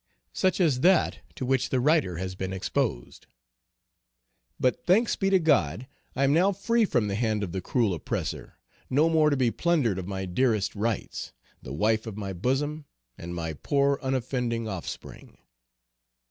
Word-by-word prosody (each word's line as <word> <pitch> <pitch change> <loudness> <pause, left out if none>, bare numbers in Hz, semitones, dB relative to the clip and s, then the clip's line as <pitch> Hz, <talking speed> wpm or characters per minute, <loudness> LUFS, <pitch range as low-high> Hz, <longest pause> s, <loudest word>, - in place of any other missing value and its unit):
Such 185 0 +1
as 155 -8 +3
that 180 +5 +3 0.2
to 130 - -4
which 130 0 +1
the 130 - +1
writer 140 - +2
has 95 +1 -4
been 95 0 -4
exposed. 95 -9 -3 1.3
But 125 - +1
thanks 210 +6 +3
be 195 - 0
to 195 - +5
God, 130 - +2 0.3
I 135 - +1
am 140 +1 +4
now 185 +5 +4
free 230 +4 +2
from 120 - +1
the 100 - -2
hand 110 -1 0
of 90 - -4
the 95 +1 -3
cruel 110 +1 +1
oppressor, 80 - -4 0.3
no 150 +5 +3
more 155 -2 +4
to 145 - +1
be 125 -3 +2
plundered 140 - +1
of 90 - -6
my 95 -1 -3
dearest 110 +2 +1
rights; 110 +1 -3 0.3
the 65 - -9
wife 110 +9 +1
of 105 -2 -6
my 100 -2 -4
bosom, 145 - -1 0.3
and 85 +1 -7
my 80 -2 -3
poor 140 - +1
unoffending 125 -3 -1
offspring. 95 -5 -7
125 Hz, 165 wpm, -27 LUFS, 95-150 Hz, 1.3 s, to